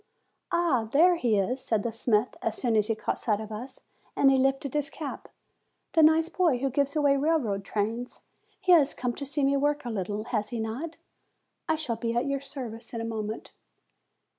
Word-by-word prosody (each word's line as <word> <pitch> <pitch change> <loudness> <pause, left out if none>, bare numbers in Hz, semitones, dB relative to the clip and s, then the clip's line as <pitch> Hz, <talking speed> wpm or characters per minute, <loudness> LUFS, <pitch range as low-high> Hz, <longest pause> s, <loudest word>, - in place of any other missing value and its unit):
"Ah! 320 -11 +1
here 350 +5 +5
he 240 -10 +1
is," 245 +7 0
said 220 -3 0
the 235 - -1
smith, 225 0 +1
as 225 - -1
soon 235 -3 0
as 210 -1 +3
he 225 - 0
caught - - -3
sight 210 -3 0
of 220 0 -7
us, 250 +5 -7 0.3
and 270 - +5
he 270 - +4
lifted 270 +1 +1
his 295 0 0
cap, 300 -3 -7 0.6
"the 325 - +5
nice 315 +1 +5
boy 335 -6 +2
who 270 +2 -1
gives 280 +2 0
away 285 -2 +4
railway 275 -9 +1
trains! 220 +5 -3 0.4
He 375 -2 +2
has 300 -5 +5
come 250 -1 -2
to 280 +3 -6
see 285 0 -1
me 275 +1 +3
work 290 0 0
a 240 - -3
little, 205 0 -3
has 215 -3 -2
he 240 - -4
not? 250 +10 -4 0.7
I 320 - +3
shall 260 -8 -2
be 230 0 -2
at 240 +2 +1
your 275 -1 -1
service 240 -4 -8
in 230 - -2
a - - -3
moment." 220 -1 -4
255 Hz, 205 wpm, -28 LUFS, 225-290 Hz, 0.7 s, here